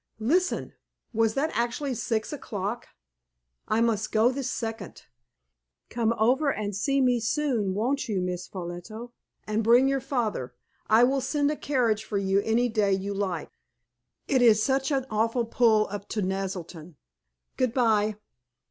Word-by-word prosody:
Listen. 330 +12 0 0.4
Was 225 -1 +2
that 305 +4 0
actually 245 +4 -1
six 225 +2 -2
o'clock? 215 -4 -4 0.8
I 220 +1 +1
must 220 -2 0
go 225 +3 +4
this 260 -1 -3
second. 225 -6 -5 0.9
Come 230 -1 +1
over 265 +7 +3
and 205 -4 -3
see 275 +8 +1
me 250 -2 +3
soon, 230 -6 0
won't 260 +5 -1
you, 200 -3 0
Miss 180 -1 -3
Ffolliot, 175 0 -7 0.6
and 215 +1 -1
bring 240 +4 +5
your 270 -1 0
father? 215 - -2 0.3
I 220 +2 +6
will 270 +2 +3
send 285 +2 0
a - - -2
carriage 240 -8 0
for 215 -1 -3
you 195 0 +2
any 230 +3 +1
day 210 -4 +1
you 195 +1 -2
like. 190 -5 -3 0.8
It 260 -2 +2
is 220 -3 +5
such 270 +1 +1
an 270 -2 0
awful 230 +3 +1
pull 225 -2 +3
up 205 -1 -6
to 210 - -1
Naselton. 185 -4 -4 0.6
Goodbye." 225 -4 +2
225 Hz, 150 wpm, -27 LUFS, 205-255 Hz, 0.9 s, I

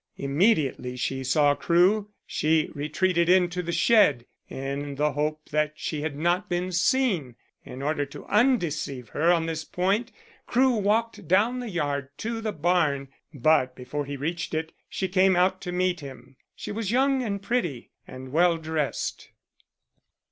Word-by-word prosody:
Immediately 140 - +1
she 130 +1 -2
saw 145 +2 +3
Crewe 185 +7 +2 0.2
she 155 0 +1
retreated 170 +4 0
into 180 -1 +3
the 170 -1 -4
shed 170 - +4 0.2
in 140 +1 -4
the 150 +2 +1
hope 155 +2 -3
that 150 0 +1
she 155 -1 -4
had 150 -2 -3
not 175 +6 0
been 180 +1 -1
seen. 180 - +1 0.3
In 130 +2 -8
order 145 0 0
to 140 - -11
undeceive 170 - 0
her 165 +4 +2
on 165 -2 +2
this 160 -1 -3
point, 195 +9 -1 0.4
Crewe 255 0 +3
walked 210 -2 0
down 215 +8 +3
the 245 -2 -5
yard 145 -7 -2
to 225 0 -4
the 220 -1 -2
barn, 155 -5 +1 0.2
but 130 -2 +2
before 135 +4 -5
he 140 0 -5
reached 160 +2 -3
it 160 0 -3 0.2
she 190 - -2
came 185 0 +3
out 185 +1 +2
to 180 - -5
meet 180 0 0
him. 135 -2 -11 0.2
She - - -7
was 210 -1 -3
young 265 +3 +2
and 205 -5 -2
pretty 195 - -2 0.2
and 130 0 -9
well 170 +2 +3
dressed. 155 -3 -3
165 Hz, 155 wpm, -26 LUFS, 145-195 Hz, 0.4 s, shed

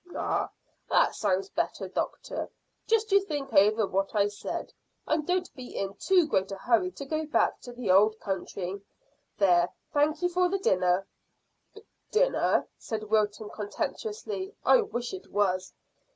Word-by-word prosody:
"Ah, - - -1 0.4
that - - +4
sounds 195 -2 0
better, - - -2
doctor. - - -3 0.4
Just 445 -1 +2
you 400 0 +6
think 290 -7 -4
over 210 +2 +5
what 195 +2 -1
I 205 0 +3
said, 205 - -5 0.3
and 310 -1 0
don't 360 0 0
be 255 -3 -9
in 195 0 -2
too 365 - +3
great 190 -9 0
a - - -3
hurry 240 - +2
to 280 - -7
go 310 +2 -2
back 300 - +2
to 245 - -9
the 240 -5 -1
old 215 +3 +5
country. 190 0 -4 0.6
There, 175 -3 +4 0.2
thankye 305 +4 +2
for 360 0 +3
the 390 - 0
dinner." 185 - +2 1.0
"Dinner!" - - +2
said 215 -1 -5
Wilton 210 -1 +1
contemptuously. 415 - -4
"I - - +6
wish 245 - -4
it 375 - -8
was." 190 -2 +1
225 Hz, 150 wpm, -28 LUFS, -, 1.0 s, you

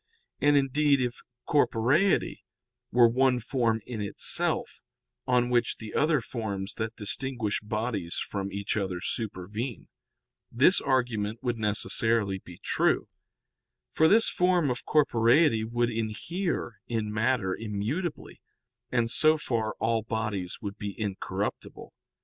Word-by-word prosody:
And, 145 0 +4
indeed, 140 +1 +3
if 125 -1 -2 0.3
corporeity 140 - +2 0.5
were 120 0 +6
one 125 +1 +2
form 115 -2 0
in 115 -4 -5
itself, 100 - 0 0.5
on 125 -1 +2
which 120 -1 +1
the 110 -1 -9
other 150 -2 +2
forms 105 -4 -4
that 110 0 -3
distinguish 115 0 -1
bodies 105 -4 -3
from 100 -1 -3
each 100 0 -2
other 95 -4 -2
supervene, 105 +4 -4 0.6
this 140 +11 +4
argument 115 -5 -1
would 120 -2 -1
necessarily 105 -1 0
be 90 -2 -13
true; - - +1 0.8
for 160 - +4
this 220 +6 +5
form 180 -6 +2
of 125 - -5
corporeity 120 -3 +4
would 120 +1 0
inhere 115 - -3
in 110 -3 -2
matter 110 -4 +1
immutably 115 - -4 0.5
and 120 -2 +1
so 155 +3 +4
far 115 -7 -2
all 115 0 0
bodies 105 -5 -3
would 100 0 -6
be 100 0 -6
incorruptible. 100 -3 -4
115 Hz, 120 wpm, -28 LUFS, 105-130 Hz, 0.8 s, were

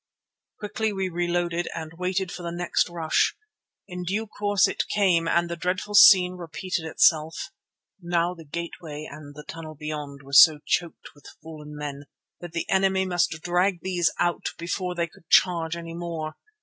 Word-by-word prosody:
Quickly 215 +1 -2
we 190 -2 -2
reloaded 175 0 -1
and 160 -1 -6
waited 185 +1 -2
for - - -7
the 170 -1 -4
next 175 +1 0
rush. 165 -2 +1 0.5
In 180 -2 -6
due 200 +5 -2
course 205 -1 +1
it - - -2
came 180 -5 +2
and 170 +1 +2
the 170 - -4
dreadful 185 +4 -3
scene 185 -4 +7
repeated 170 0 -4
itself. 160 - +2 0.5
Now 175 0 0
the 165 -2 -12
gateway 155 -1 -6
and 145 -1 -11
the 150 - -10
tunnel 160 -1 -8
beyond 150 -2 -6
were 140 +1 -13
so 155 +2 +9
choked 170 -2 -2
with 145 - -17 0.2
fallen 150 -2 -10
men 145 -1 -6 0.3
that 175 -2 -8
the 170 - -3
enemy 190 0 +2
must 175 -3 0
drag 180 +1 +1
these 180 -2 +1
out 175 0 -1
before 180 +1 -3
they 170 -1 0
could 165 -1 -20
charge 170 -3 +3
any 165 -1 -7
more. 165 -2 -5
170 Hz, 165 wpm, -25 LUFS, 160-180 Hz, 0.5 s, so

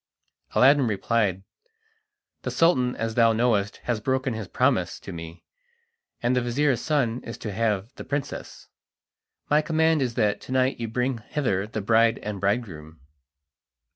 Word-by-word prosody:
Aladdin 135 0 +5
replied: 105 -2 0 1.0
"The - - -3
Sultan, 130 -7 +2
as 115 0 -3
thou 115 0 +4
knowest, 110 -3 +1
has 120 -3 -1
broken 130 +2 -1
his 110 -3 -5
promise - - +1
to - - -9
me, 85 0 -9 0.8
and 120 +2 +2
the 125 - +2
vizir's 130 +2 +1
son 130 -6 0
is 115 - -7
to 105 - -5
have 105 +1 -1
the - - -6
princess. 140 0 -5 0.8
My 150 +1 +5
command 160 0 +2
is 120 -3 -1
that 105 -4 +1
to - - -10
night 130 0 +1
you 115 - -3
bring 125 +2 -1
hither 105 -5 -2
the 110 0 -4
bride 115 +2 +3
and 105 -2 -5
bridegroom." 90 -7 -2
115 Hz, 150 wpm, -25 LUFS, 105-130 Hz, 1.0 s, Aladdin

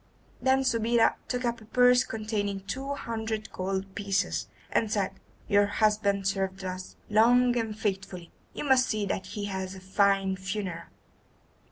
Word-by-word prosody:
Then 265 0 +3
Subida 230 -2 +3
took 250 0 -2
up 235 -1 -1
a - - -13
purse 250 +2 +5
containing 210 -3 -3
two 270 +8 -4
hundred 220 -4 -4
gold 190 +1 -3
pieces, 200 -1 -1 0.2
and 220 -2 +1
said: 200 -3 0 0.4
"Your 205 -1 +4
husband 205 -2 +1
served 195 -1 -2
us 185 0 -6
long 245 +3 +4
and 225 -3 -2
faithfully. 190 -4 -3 0.2
You - - -3
must 265 -3 +4
see 215 -2 0
that 190 -1 -3
he 205 +1 -4
has 190 -1 -4
a - - -9
fine 195 0 +2
funeral." 190 -3 -4
205 Hz, 150 wpm, -28 LUFS, 195-230 Hz, 0.4 s, purse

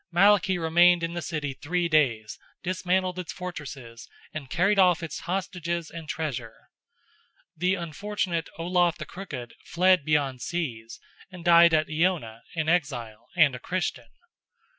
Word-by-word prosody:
Malachy 195 +1 +4
remained 175 +1 +4
in 165 0 -2
the 175 - -3
city 150 -4 -3
three 170 +6 -1
days, 125 -9 +1 0.2
dismantled 185 0 0
its 180 - -5
fortresses, 140 -10 -8 0.3
and 145 -4 -6
carried 195 +7 +2
off 180 -2 +4
its 165 - -5
hostages 170 -2 -3
and 165 -2 -9
treasure. 120 -8 -5 0.9
The 180 +4 +1
unfortunate 175 0 -3
Olaf 175 0 +1
the 155 - -6
Crooked 140 -11 -8
fled 185 -1 +3
beyond 140 -4 0
seas, 120 -9 -4 0.3
and 180 -3 -11
died 170 -1 +7
at 155 0 +2
Iona, 155 -9 -1
in 160 -2 -1
exile, 135 -10 -1
and 155 -6 +5
a 125 - -6
Christian. 145 -8 -3
170 Hz, 140 wpm, -26 LUFS, 145-180 Hz, 0.9 s, died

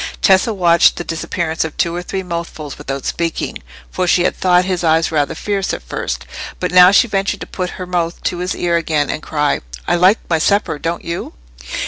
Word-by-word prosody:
Tessa 190 +3 +4
watched 175 -4 +4
the - - -5
disappearance 165 0 -2
of 160 -1 -6
two 170 0 0
or 175 - -3
three 190 +2 -4
mouthfuls 170 -4 -5
without 135 -1 -5
speaking, 170 -1 -2 0.3
for 185 -1 -1
she 175 0 +3
had - - +1
thought 180 -1 +3
his 185 -2 -1
eyes 165 0 +2
rather 145 -3 0
fierce 200 -2 -2
at - - -10
first; - - -4 0.3
but 180 - -2
now 180 0 +8
she 200 +5 +5
ventured 195 -2 -1
to - - -4
put 180 -1 -4
her 185 - -5
mouth 175 -1 -2
to 175 - -1
his 180 +1 -2
ear 170 -1 +1
again 155 -3 0
and 155 - -4
cry— 150 -2 0 0.3
"I 175 - +2
like 185 +5 +5
my 165 -2 +1
supper, 170 -3 +1
don't 165 +2 -3
you?" 170 0 -4
175 Hz, 205 wpm, -17 LUFS, 165-185 Hz, 0.3 s, now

